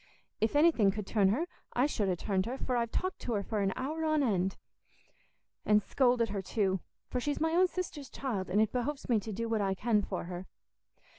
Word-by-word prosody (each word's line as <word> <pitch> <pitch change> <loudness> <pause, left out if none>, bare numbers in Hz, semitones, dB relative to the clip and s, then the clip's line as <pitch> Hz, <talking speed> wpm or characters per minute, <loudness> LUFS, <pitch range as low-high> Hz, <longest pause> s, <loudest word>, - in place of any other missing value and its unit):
If 220 +5 +1
anything 295 -9 +5
could 210 +1 -3
turn 200 -2 +3
her, 270 - +1 0.3
I 250 - +3
should 215 -9 0
ha' 180 - 0
turned 190 -1 0
her, 255 +3 -3
for 255 - -2
I've 235 -1 +1
talked 370 +10 -2
to 240 - -3
her 205 -2 0
for 210 +1 -2
a 195 -1 +1
hour 305 +5 -3
on 310 -2 +2
end, 190 -5 +1 1.1
and 210 -1 +4
scolded 245 -3 +2
her 200 -1 -2
too; 190 -1 0 0.3
for 250 - 0
she's 290 +3 -1
my 320 +1 +1
own 360 +3 +5
sister's 335 -6 -5
child, 220 -9 -3
and 195 +3 +2
it 215 -1 +3
behoves 270 +3 -2
me 230 -3 +4
to 215 +2 -6
do 230 +3 -3
what 225 -2 0
I 195 -1 +1
can 215 +1 +2
for - - -4
her. 180 +1 -6
225 Hz, 220 wpm, -31 LUFS, 200-275 Hz, 1.1 s, anything